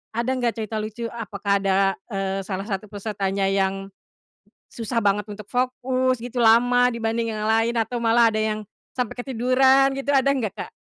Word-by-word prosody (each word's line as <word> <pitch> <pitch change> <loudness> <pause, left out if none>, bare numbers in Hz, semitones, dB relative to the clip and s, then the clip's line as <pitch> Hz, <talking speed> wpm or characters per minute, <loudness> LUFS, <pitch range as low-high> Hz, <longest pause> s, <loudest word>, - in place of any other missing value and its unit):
ada 235 +2 -1
gak 235 -3 0
cerita 220 -1 -4
lucu? 220 +2 -5
Apakah 200 -3 -2
ada, 195 -1 +1 0.3
eee, 195 -2 -2
salah 195 -1 -3
satu 205 -1 -4
pesertanya 195 -1 -2
yang 195 0 -1 0.8
susah 230 0 -2
banget 205 +1 +1
untuk 210 -1 -10
fokus 255 0 0
gitu, 245 0 -5
lama 245 +2 +5
dibanding 225 0 -2
yang 210 - -4
lain 225 +2 +2
atau 230 +1 -1
malah 230 0 +4
ada 215 - -2
yang 215 0 -1 0.3
sampai 250 -1 -3
ketiduran 265 +2 +3
gitu, 280 +1 0
ada 275 +1 +4
gak, 235 -8 -1
Kak? - - -10
225 Hz, 165 wpm, -23 LUFS, 205-245 Hz, 0.8 s, lama